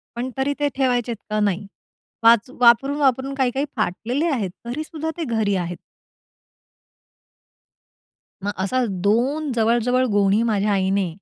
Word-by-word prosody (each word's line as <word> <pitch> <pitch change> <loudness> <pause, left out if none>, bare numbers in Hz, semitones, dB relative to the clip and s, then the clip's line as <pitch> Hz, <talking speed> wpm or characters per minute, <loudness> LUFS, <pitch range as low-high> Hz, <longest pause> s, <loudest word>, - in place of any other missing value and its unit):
पण 250 +2 -3
तरी 275 +2 0
ते 290 - +2
ठेवायचेत 245 -3 0
का 215 0 0
नाही? 200 -1 0 0.6
वाच 230 +1 +5
वापरून-वापरून 270 +2 +3
काही, 255 -2 +2
काही 275 +3 -1
फाटलेले 230 - -1
आहेत 210 -9 -1 0.2
तरीसुद्धा 310 +5 -4
ते 335 - -2
घरी 205 -2 +1
आहेत. 175 -1 -3 2.7
मग 205 - -1
असा 255 +6 0 0.2
दोन 265 +7 +1
जवळ-जवळ 240 +3 +2
गोणी 200 +1 +3
माझ्या 210 -2 +1
आईने 190 0 +1
235 Hz, 125 wpm, -22 LUFS, 205-265 Hz, 2.7 s, वाच